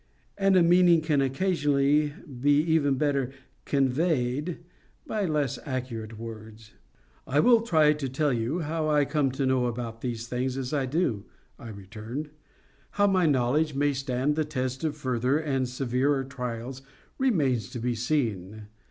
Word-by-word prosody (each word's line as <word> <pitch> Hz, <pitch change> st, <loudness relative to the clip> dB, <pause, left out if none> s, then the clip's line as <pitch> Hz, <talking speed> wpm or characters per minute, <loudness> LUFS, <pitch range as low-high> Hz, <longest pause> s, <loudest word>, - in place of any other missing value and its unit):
And 195 Hz, -1 st, +3 dB
a 175 Hz, -, +6 dB
meaning 175 Hz, -1 st, +5 dB
can 155 Hz, -3 st, +1 dB
occasionally 145 Hz, -1 st, +1 dB, 0.2 s
be 145 Hz, +2 st, +4 dB
even 155 Hz, -3 st, +2 dB
better 140 Hz, -2 st, 0 dB, 0.4 s
CONVEYED 140 Hz, +2 st, 0 dB, 0.5 s
by 210 Hz, -2 st, -1 dB
less 150 Hz, -5 st, -1 dB
accurate 120 Hz, -5 st, -5 dB
words. 110 Hz, -1 st, -10 dB, 0.5 s
"I 145 Hz, -, +2 dB
will 235 Hz, +6 st, +5 dB
try 155 Hz, -9 st, +4 dB
to 145 Hz, -3 st, -4 dB
tell 145 Hz, +1 st, 0 dB
you 120 Hz, +9 st, -1 dB
how 155 Hz, 0 st, -2 dB
I 150 Hz, -1 st, +3 dB
come 145 Hz, -2 st, +1 dB
to 135 Hz, 0 st, -1 dB
know 130 Hz, -1 st, +2 dB
about 115 Hz, -1 st, -5 dB
these 115 Hz, -2 st, -4 dB
things 125 Hz, +2 st, -2 dB
as 130 Hz, +1 st, -4 dB
I 135 Hz, -3 st, 0 dB
do," 130 Hz, -, -1 dB, 0.3 s
I 115 Hz, -, -9 dB
returned. 110 Hz, +8 st, -7 dB, 0.7 s
"How 205 Hz, -, +5 dB
my 185 Hz, -4 st, +3 dB
knowledge 145 Hz, +2 st, +1 dB
may 145 Hz, +1 st, +2 dB
stand 135 Hz, +1 st, -1 dB
the 155 Hz, -, +1 dB
test 130 Hz, -2 st, -3 dB
of 155 Hz, -2 st, -1 dB
further 130 Hz, 0 st, 0 dB
and 135 Hz, -5 st, -1 dB
severer 135 Hz, +2 st, 0 dB
trials 125 Hz, 0 st, -6 dB, 0.4 s
remains 150 Hz, -, +1 dB
to -, -, -7 dB
be 120 Hz, +1 st, -1 dB
seen. 110 Hz, -5 st, -2 dB
135 Hz, 150 wpm, -27 LUFS, 125-155 Hz, 0.7 s, a